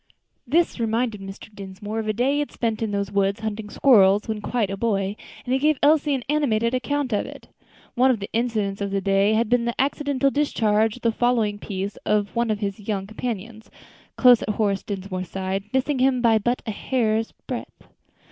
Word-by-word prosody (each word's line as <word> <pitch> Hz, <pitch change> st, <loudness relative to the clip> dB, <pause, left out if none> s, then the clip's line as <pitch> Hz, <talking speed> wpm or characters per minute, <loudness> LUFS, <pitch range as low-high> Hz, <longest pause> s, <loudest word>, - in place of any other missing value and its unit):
This 325 Hz, +2 st, +1 dB
reminded 225 Hz, -1 st, -1 dB
Mr. 195 Hz, +2 st, -10 dB
Dinsmore 205 Hz, +2 st, -6 dB
of 220 Hz, -, -4 dB
a -, -, +2 dB
day 250 Hz, +6 st, +1 dB
he 290 Hz, -, +1 dB
had 295 Hz, -, -2 dB
spent 225 Hz, -2 st, -2 dB
in 225 Hz, -, -1 dB
those 200 Hz, -1 st, -2 dB
woods 200 Hz, +1 st, 0 dB
hunting 215 Hz, -1 st, -4 dB
squirrels, 205 Hz, -5 st, +4 dB
when 220 Hz, -1 st, -3 dB
quite 215 Hz, -2 st, -1 dB
a -, -, -2 dB
boy, 200 Hz, -2 st, -1 dB, 0.3 s
and 250 Hz, -, -1 dB
he 265 Hz, -, +2 dB
gave 300 Hz, +1 st, +2 dB
Elsie 295 Hz, -1 st, +4 dB
an 255 Hz, -, -4 dB
animated 245 Hz, -6 st, +1 dB
account 260 Hz, 0 st, -1 dB
of 205 Hz, -, 0 dB
it. -, -, -12 dB, 0.4 s
One 255 Hz, +2 st, +4 dB
of 245 Hz, -4 st, +2 dB
the 200 Hz, -, -5 dB
incidents 220 Hz, -4 st, -1 dB
of 200 Hz, -, -1 dB
the 195 Hz, 0 st, 0 dB
day 195 Hz, +2 st, +2 dB
had 230 Hz, +1 st, +2 dB
been 240 Hz, +1 st, +2 dB
the 235 Hz, -, -3 dB
accidental 275 Hz, 0 st, +1 dB
discharge 220 Hz, -7 st, +1 dB
of 250 Hz, -, -15 dB
the 230 Hz, -, +3 dB
fowling 225 Hz, -3 st, +1 dB
piece 195 Hz, 0 st, -5 dB
of 210 Hz, 0 st, -1 dB
one 235 Hz, 0 st, +1 dB
of 215 Hz, 0 st, -1 dB
his 200 Hz, 0 st, -3 dB
young 205 Hz, -2 st, -3 dB
companions, 220 Hz, 0 st, -6 dB, 0.5 s
close 250 Hz, -3 st, +6 dB
at -, -, -4 dB
Horace 205 Hz, -2 st, 0 dB
Dinsmore's 185 Hz, -3 st, -5 dB
side, 190 Hz, +1 st, -3 dB
missing 265 Hz, +1 st, 0 dB
him 260 Hz, 0 st, +3 dB
by 230 Hz, -2 st, +4 dB
but 240 Hz, +4 st, -1 dB
a 220 Hz, -, -2 dB
hair's 225 Hz, 0 st, 0 dB
breadth. -, -, -7 dB
220 Hz, 205 wpm, -23 LUFS, 200-250 Hz, 0.5 s, close